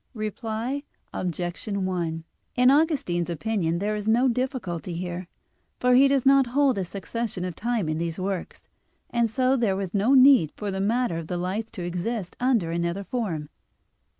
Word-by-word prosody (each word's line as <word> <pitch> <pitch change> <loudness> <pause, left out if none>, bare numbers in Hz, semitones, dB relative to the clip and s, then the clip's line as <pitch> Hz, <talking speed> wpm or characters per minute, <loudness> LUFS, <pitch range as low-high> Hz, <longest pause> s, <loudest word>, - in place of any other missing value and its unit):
Reply 225 +5 -3 0.3
Obj. 175 +4 -3
1: 180 -5 -2 0.3
In 250 +1 +5
Augustine's 275 - +1
opinion 170 -1 -1
there 210 +3 -1
is 210 0 -4
no 240 +4 +4
difficulty 230 - -2
here; 175 +1 -5 0.5
for 250 0 +3
he 265 +2 +7
does 275 -2 +1
not 270 -1 +5
hold 270 -7 +3
a - - 0
succession 195 +1 -4
of 180 -3 -5
time 230 -4 -1
in 155 0 -1
these 170 -1 -3
works, 190 -1 -4 0.4
and 235 -1 +2
so 255 +3 +2
there 225 -7 +1
was 190 -2 -4
no 215 +7 +3
need 260 - +6
for 205 -2 -4
the 190 0 -2
matter 225 -3 +1
of 165 - -7
the 180 - -3
lights 195 +6 -3
to 185 - -5
exist 180 +3 -3
under 235 -10 +2
another 170 +3 -1
form. 185 -11 -3
205 Hz, 170 wpm, -25 LUFS, 175-245 Hz, 0.5 s, he